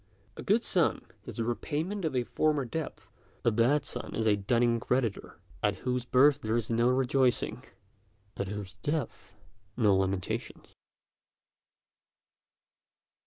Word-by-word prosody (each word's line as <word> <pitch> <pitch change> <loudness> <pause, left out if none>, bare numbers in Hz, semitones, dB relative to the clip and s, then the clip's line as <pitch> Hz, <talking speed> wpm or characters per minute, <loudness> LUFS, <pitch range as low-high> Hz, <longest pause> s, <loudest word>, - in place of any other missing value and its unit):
A - - -7
good 220 +4 +2
son 175 -5 +1 0.2
is - - -7
the 115 - -1
repayment 160 - -2
of 150 -4 -1
a 125 - +2
former 150 +2 +1
debt; 155 +6 -5 0.4
a 115 - +5
bad 125 +6 +2
son - - -6
is 110 - -1
a 105 -2 +4
dunning 115 +3 +2
creditor, 120 -3 -1 0.2
at 105 0 +1
whose 125 -1 0
birth 140 +3 +4
there 110 -2 -1
is 115 -1 -2
no 120 +2 +3
rejoicing, 125 -2 +1 0.7
at 100 - -3
whose 100 0 -6
death 145 0 -4 0.4
no 105 -5 +4
lamentations." 95 -1 -2
120 Hz, 130 wpm, -30 LUFS, 110-145 Hz, 0.7 s, a